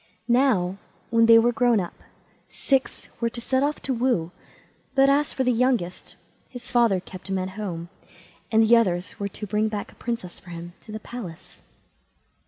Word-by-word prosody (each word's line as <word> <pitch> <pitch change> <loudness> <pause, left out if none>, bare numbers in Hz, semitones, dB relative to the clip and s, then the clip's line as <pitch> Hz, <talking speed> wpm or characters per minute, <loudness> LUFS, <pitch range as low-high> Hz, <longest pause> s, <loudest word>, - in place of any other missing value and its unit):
Now, 230 -7 +2 0.3
when 230 -1 +5
they 230 0 +9
were 235 +1 +4
grown 240 -1 +3
up, 175 -2 -4 0.6
six 270 -1 -1
were 235 - +1
to 235 - -7
set 260 +2 0
off 290 +2 0
to 270 - 0
woo, 235 -9 0 0.6
but 270 0 +5
as 290 +1 +2
for 265 - -1
the 250 - +3
youngest, 235 -7 0 0.3
his 245 -2 -9
father 230 -6 +4
kept 185 +1 -11
him 190 - 0
at 185 0 -3
home, 185 -5 -5 0.6
and 225 0 +5
the 225 +2 +6
others 185 -6 0
were 200 - -1
to 210 - -6
bring 210 +2 +1
back 210 -2 -4
a - - -21
princess 230 -7 -4
for 180 - -16
him 170 0 -8
to - - -10
the 215 - -5
palace. 205 -8 -9
225 Hz, 185 wpm, -25 LUFS, 185-245 Hz, 0.6 s, they